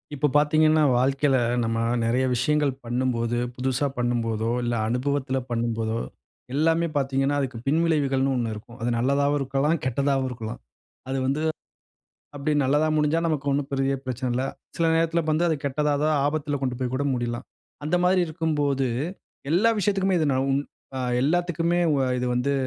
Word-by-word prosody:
இப்போ 145 +2 +2
பார்த்தீங்கன்னா 155 +1 +4
வாழ்க்கையில 135 +2 +2 0.3
நம்ம 115 0 -1 0.2
நிறைய 120 +3 +1
விஷயங்கள் 145 +3 +2
பண்ணும்போது, 120 -1 -1 0.2
புதுசா 130 +2 0
பண்ணும் 120 -1 0
போதோ 110 0 -1 0.2
இல்ல, 120 0 -1 0.2
அனுபவத்துல 135 +2 -1
பண்ணும் 115 -1 -1
போதோ 110 0 -1 0.6
எல்லாமே 165 +3 +2
பார்த்தீங்கன்னா, 135 0 +1
அதுக்கு 130 -3 -3
பின்விளைவுகள்ன்னு 140 -4 +2
1 120 -3 -1
இருக்கும். 110 +2 -11
அது 120 - 0
நல்லதாவும் 140 +4 +2
இருக்கலாம், 135 +4 +1
கெட்டதாவும் 135 +1 0
இருக்கலாம். 115 -3 -6 0.5
அது 135 - -1
வந்து 140 +4 0 0.9
அப்படி 145 +2 -1
நல்லதா 145 +4 +2
முடிஞ்சா 150 +1 +2
நமக்கு 150 -3 -1
ஒண்ணும் 140 0 0
பெரிய 135 0 +1
பிரச்சனை 130 0 -3
இல்ல. 130 +2 0 0.3
சில 165 - +2
நேரத்தில 165 +1 +2
வந்து 160 +3 +2
அது 160 - +1
கெட்டதா, 145 +2 0
ஏதா 150 - +2 0.2
ஆபத்துல 145 -1 -1
கொண்டு 125 -2 -2
போய் 130 -1 -2
கூட 140 +2 -1
முடியலாம். 120 -1 -3 0.4
அந்த 155 +4 +1
மாதிரி 185 +1 +4
இருக்கும்போது 150 -4 0 0.6
எல்லா 195 +8 +4
விஷயத்துக்குமே 195 -1 +1
இது 155 - +2
ந - - +1
உ - - +2 0.4
அ - - -2 0.2
எல்லாத்துக்குமே 175 +2 +1
உ - - +3 0.2
இது 125 - -1
வந்து 125 +3 0
140 Hz, 155 wpm, -25 LUFS, 125-155 Hz, 0.9 s, பார்த்தீங்கன்னா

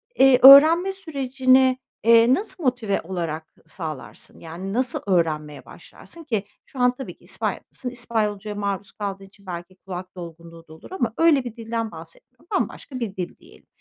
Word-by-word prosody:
eee, 265 - +6
öğrenme 315 +8 +9
sürecini, 265 -7 +2 0.3
eee, 230 +2 +6
nasıl 380 -1 -3
motive 245 -6 0
olarak 165 -3 -5
sağlarsın? 155 -7 -7
Yani, 175 +4 -7
nasıl 250 +1 0
öğrenmeye 155 -5 -1
başlarsın? 335 -1 -12
Ki 220 -8 -2 0.2
şu 265 - -12
an 250 0 +3
tabii 265 - -8
ki - - -27
İspanya'dasın. 255 - -4
İspanyolcaya 215 -4 -2
maruz 200 -1 -3
kaldığın 195 -2 -6
için 200 0 -22
belki 175 +1 -8
kulak 185 -1 -9
dolgunluğu 165 -1 -11
da 155 - -13
olur 160 - -15
ama 240 -12 -2
öyle 325 -5 +4
bir 240 -3 -7
dilden 230 -1 -4
bahsetmiyorum. - - -13
Bambaşka 260 -3 -3
bir 210 -5 -4
dil 180 -2 -5
diyelim. - - -20
220 Hz, 155 wpm, -23 LUFS, 185-260 Hz, 0.3 s, öğrenme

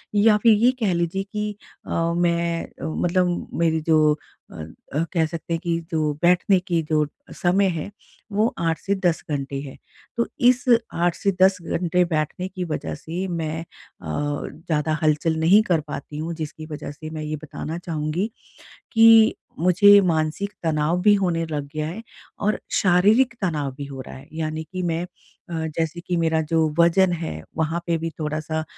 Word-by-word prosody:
या 210 +1 +5
फिर 230 -2 +7
ये 235 +4 +4
कह 205 -6 +1
लीजिए 170 +3 -1
कि 210 0 -2 0.4
अ, - - -6 0.3
मैं 170 -1 +1
अ, - - -14
मतलब 175 +2 0
मेरी 160 -1 +2
जो 155 -2 +5 0.4
अ - - -12
अ, 80 - -5
कह 165 -2 +3
सकते 165 +1 -5
हैं 165 - 0
कि 170 -1 0
जो 155 -2 +1
बैठने 180 +2 +4
की 175 -2 -1
जो 155 -1 +3 0.4
समय 190 +2 +4
है 180 - -6 0.4
वो 215 +4 +1
8 165 -1 0
से 200 +1 -1
10 170 -2 +2
घंटे 140 -1 -3
है। 135 -2 -9 0.4
तो 235 - +1 0.2
इस 255 +2 +1 0.3
8 175 0 +1
से 200 - 0
10 190 +1 +6
घंटे 175 +1 +1
बैठने 160 +2 -2
की 185 -1 -5
वजह 80 - -4
से 175 - -5
मैं 165 -2 -3
अ, 165 - -10 0.9
ज़्यादा 155 0 -1
हलचल 155 +1 +2
नहीं 180 +7 +6
कर 170 -6 +1
पाती 150 0 -6
हूँ 160 +2 -3
जिसकी 155 0 -6
वजह 150 - -6
से 155 +2 -9
मैं 155 -1 -6
ये 155 0 -3
बताना 155 +2 -5
चाहूँगी, 165 +3 -2 0.6
कि 225 -1 +7 0.2
मुझे 200 +4 +7
मानसिक 165 +4 0
तनाव 160 +2 +1
भी 205 +2 +6
होने 175 -4 0
लग 145 -3 -4
गया 155 0 -2
है 180 +8 -6 0.4
और 210 - +1 0.2
शारीरिक 205 +8 +4
तनाव 150 -7 -1
भी 145 - -5
हो 135 -1 -7
रहा - - -10
है। 135 +2 -12
यानी 155 0 -3
कि 185 - -2
मैं 170 0 -1
अ, 170 -2 -8
जैसे 165 +1 -1
कि 180 - 0
मेरा 160 -1 +2
जो 160 -1 +4
वजन 175 +2 +5
है, 160 - -5
वहाँ 160 +1 0
पे 170 -1 +1
भी 165 +1 -2
थोड़ा-सा 155 +1 -2
165 Hz, 175 wpm, -23 LUFS, 155-185 Hz, 0.9 s, फिर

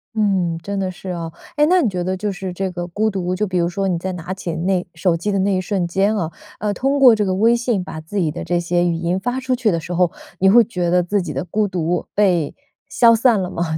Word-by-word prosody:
嗯， 190 -6 +1
真 200 0 -3
的 190 -1 -1
是 185 +1 -8
啊， 170 -2 -4 0.2
哎， 295 - +4
那 365 0 +5
你 235 - +2
觉 180 -2 -3
得 185 +1 -2
就 205 +2 -2
是 190 0 -5
这 190 +1 -3
个 175 0 -5
孤 215 +5 0
独， 185 -2 -2
就 210 +3 0
比 185 -2 -1
如 170 0 +1
说 195 +2 -2
你 180 - 0
在 190 +2 -3
拿 180 +1 -5
起 185 -3 -5
那 180 +2 0
手 170 +1 +1
机 190 +5 -2
的 195 - 0
那 195 +1 +1
一 185 - 0
瞬 185 -1 -1
间 195 +5 +1
啊， 165 -4 -2 0.3
呃， 210 -1 -1
通 275 +6 0
过 255 -3 +8
这 210 - 0
个 190 -2 0
微 230 +5 +4
信 235 -5 -1
把 160 -3 -7
自 160 +6 -7
己 165 -6 +1
的 - - -6
这 175 +1 0
些 175 0 +1
语 170 - 0
音 170 +2 -1
发 245 +5 -2
出 255 -1 -1
去 240 -3 +1
的 170 -4 +1
时 175 +2 -6
候， 175 -1 +2 0.3
你 190 +1 +5
会 235 +3 +7
觉 180 -5 -2
得 180 +1 +3
自 200 +3 0
己 170 -4 -5
的 135 +5 -3
孤 210 +3 0
独 175 -2 -2
被 180 -7 +2 0.3
消 230 -1 +5
散 230 -1 +3
了 185 -1 -3
吗？ 165 -3 -2
185 Hz, 295 characters per minute, -20 LUFS, 175-210 Hz, 0.3 s, 过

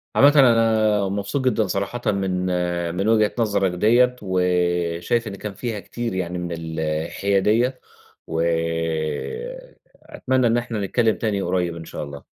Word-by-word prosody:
عامةً 145 +1 +6
أنا 110 -5 +4
مبسوط 100 +7 -2
جدًا 110 -4 +2
صراحةً 100 +6 -3
من 95 -2 -1 0.5
من 100 +3 -1
وجهة 110 -2 +3
نظرك 100 -4 +1
ديّة، 120 +7 +3
وشايف 90 +2 0
إن 100 - -5
كان 105 0 -6
فيها 115 0 -4
كتير 115 +4 -5
يعني 90 -1 -3
من 90 0 -4
الحيادية، 95 +9 0 0.5
وأتمنى 85 - -2
إن 115 +1 +2
إحنا 120 -2 -3
نتكلم 110 +2 +2
تاني 105 -3 -1
قريب 90 -2 -1
إن 80 -1 -8
شاء - - -6
الله. 70 -1 -9
100 Hz, 130 wpm, -22 LUFS, 85-115 Hz, 0.5 s, عامةً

